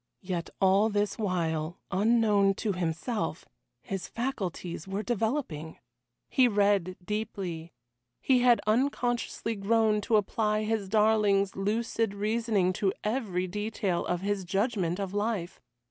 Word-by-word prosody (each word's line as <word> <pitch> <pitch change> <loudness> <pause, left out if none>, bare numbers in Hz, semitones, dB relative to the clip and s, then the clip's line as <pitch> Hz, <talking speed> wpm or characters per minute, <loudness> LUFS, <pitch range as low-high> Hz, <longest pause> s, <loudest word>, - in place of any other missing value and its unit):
Yet 180 -3 -3
all 195 +3 +4
this 205 +1 -1
while, 170 -4 -1
unknown 205 -1 +3
to 215 - -1
himself, 180 +6 -2 0.4
his 195 -2 -4
faculties 190 -9 -4
were 195 +2 -3
developing. 220 - -2 0.5
He 255 -2 +4
read 200 -4 +2
deeply. 195 -6 -4 0.5
He 260 -2 +3
had 245 -1 +5
unconsciously 240 0 0
grown 215 +1 +2
to 220 - +1
apply 210 +1 +1
his 215 -3 -1
darling's 210 -2 +3
lucid 220 +1 -1
reasoning 210 -3 +1
to 195 -2 +3
every 210 -5 -1
detail 205 -2 -2
of 175 0 -1
his 200 0 -1
judgment 195 -1 0
of 195 -1 -3
life. 205 -4 -2
205 Hz, 120 wpm, -29 LUFS, 185-225 Hz, 0.5 s, had